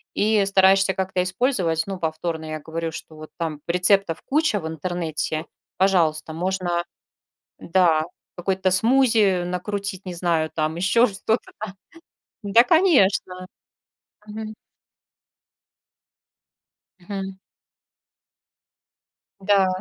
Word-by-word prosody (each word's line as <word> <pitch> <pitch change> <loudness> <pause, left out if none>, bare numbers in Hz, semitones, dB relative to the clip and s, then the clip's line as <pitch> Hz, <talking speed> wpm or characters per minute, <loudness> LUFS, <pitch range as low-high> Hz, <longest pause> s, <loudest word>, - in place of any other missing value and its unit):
И 210 0 +3
стараешься 195 0 +4
как-то 190 -1 -1
использовать, 180 - 0
ну, 195 -1 -4
повторно, 160 -1 -3
я 155 0 -5
говорю, 165 +2 -4
что 160 0 -9
вот 155 0 -11
там 155 -3 -4
рецептов 180 0 +2
куча 300 -7 +1
в 160 - -6
интернете, 160 -1 -3 0.3
пожалуйста, 165 -5 +2
можно, 175 0 -1 0.8
да, 170 -3 +2 0.3
какой-то 190 +1 0
смузи 220 -2 +3
накрутить, 190 +2 -4
не 180 - -5
знаю 170 -2 0
там, 155 0 -1
еще 210 +8 +3
что-то 220 +3 -2
там. 205 -2 -6 0.7
Да, 205 +4 +6
конечно! 205 - +2 0.8
Мгм. 215 +1 -7 2.5
Мгм. 195 +1 -6 2.0
Да. 195 -1 +3
185 Hz, 95 wpm, -23 LUFS, 165-200 Hz, 2.5 s, Да